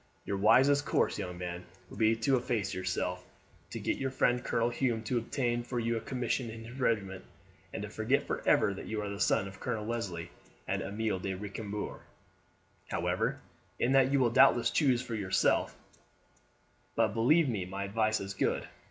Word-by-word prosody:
Your 100 - -2
wisest 130 +8 +5
course, - - +1
young 90 -1 -5
man, 90 0 -5 0.2
would - - -11
be 110 0 +4
to 125 +4 +2
efface 115 -6 -1
yourself, 90 0 -2 0.5
to - - -5
get - - -1
your 135 - -1
friend 125 -1 +1
Colonel 115 +1 +1
Hume 120 -2 0
to 120 +2 0
obtain 120 0 -1
for 120 +1 -3
you 115 0 0
a - - 0
commission 125 -1 -2
in 115 0 -8
his 120 +4 -10
regiment, 100 -6 0 0.5
and - - -5
to - - -5
forget - - +1
for - - -3
ever 100 - +4
that 95 - -8
you 110 - -2
are 105 - -3
the 100 0 -6
son 95 - +2
of 95 - -11
Colonel 105 -1 -3
Leslie 95 -8 -4 0.4
and - - -1
Amelie 105 -1 -2
de 95 +1 -3
Recambours. 105 +1 -5 0.9
However, - - -1 0.4
in 120 - +1
that 135 -1 +5
you 140 - +3
will 120 -3 +3
doubtless 130 -1 +5
choose 130 -5 +2
for 125 - -6
yourself; 100 -4 +1 1.2
but - - +2
believe 145 +8 +4
me 105 -7 -2
my 95 +2 -4
advice 110 +2 +1
is 95 0 -5
good. 95 - 0
115 Hz, 185 wpm, -31 LUFS, 100-125 Hz, 1.2 s, wisest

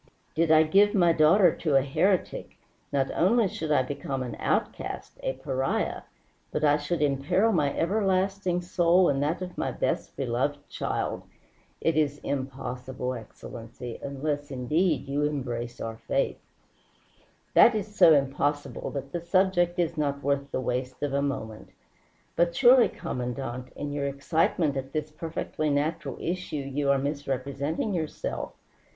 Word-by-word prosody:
Did 165 +1 +1
I 155 0 +7
give 200 +7 +4
my 175 -4 +5
daughter 165 +3 +5
to 155 -5 0
a 135 - +5
heretic, 180 +7 0 0.3
not 135 -1 +1
only 215 +4 +3
should 160 -3 -4
I 140 - +4
become 135 0 -4
an 125 - -5
outcast, - - -2
a 130 - -1
pariah, 135 0 -2 0.5
but 150 - -3
I 145 -1 +5
should 150 +2 -1
imperil 145 +10 +2
my 150 -7 +2
everlasting 190 -1 +1
soul 175 +1 +3
and 140 0 +1
that 165 +5 -1
of 180 -1 -7
my - - 0
best - - -2
beloved 135 +3 -1
child. - - -3 0.6
It 165 - +1
is 145 -2 +1
impossible, 130 -2 -4
Excellency 115 +1 -9
unless, 145 +1 -3
indeed, 145 +3 0
you 140 +1 -1
embrace 125 -5 -2
our 115 0 -5
faith." - - -1 1.1
"That 235 - +7
is 210 0 -4
so 160 -5 +7
impossible 145 +1 -1
that 140 -1 -6
the 170 - -3
subject 175 0 +2
is 170 -2 0
not 140 -1 -1
worth 140 0 0
the - - -2
waste 125 +1 -3
of 145 -2 -1
a 140 - +2
moment. 120 -6 -4 0.7
But 170 0 +2
surely, 250 +1 +6
Commandante, 125 0 -5
in 145 0 -4
your 145 -1 -1
excitement 150 +1 +1
at 135 0 -5
this 155 0 -2
perfectly 155 -1 -3
natural 145 +3 -1
issue 180 -1 -3
you 140 0 -2
are 140 - +5
misrepresenting 140 - -2
yourself. 160 -4 -3
145 Hz, 145 wpm, -27 LUFS, 135-170 Hz, 1.1 s, I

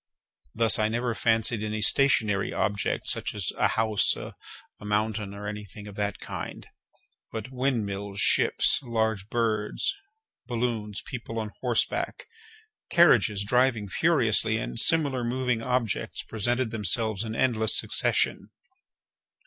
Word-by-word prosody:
Thus, 115 -1 +5
I 110 - +2
never 120 +1 -1
fancied 115 -1 +1
any 110 0 -2
stationary 110 -8 +2
object, 100 0 -1
such - - 0
as - - -2
a - - +2
house, 110 -2 +1
a - - -8 0.5
mountain, 105 0 -2
or 100 +1 -8
any 105 0 -5
thing 105 +1 -11
of 105 - -9
that 100 0 -2
kind; - - -7 0.7
but 110 +3 -6
windmills, 100 -7 -2
ships, - - +4
large 110 -5 -2
birds, 115 - -1 0.5
balloons, 115 -4 -3
people 115 -3 -7
on 110 -2 -3
horseback, 120 -3 0 0.6
carriages 115 - +4
driving 125 -2 +2
furiously, - - +2
and - - -4
similar 145 -6 +2
moving 125 -1 -1
objects, 125 -3 -2
presented 120 +2 -1
themselves 110 0 -1
in 110 -1 -5
endless 110 -4 +2
succession. - - +1
110 Hz, 125 wpm, -26 LUFS, 105-120 Hz, 0.7 s, Thus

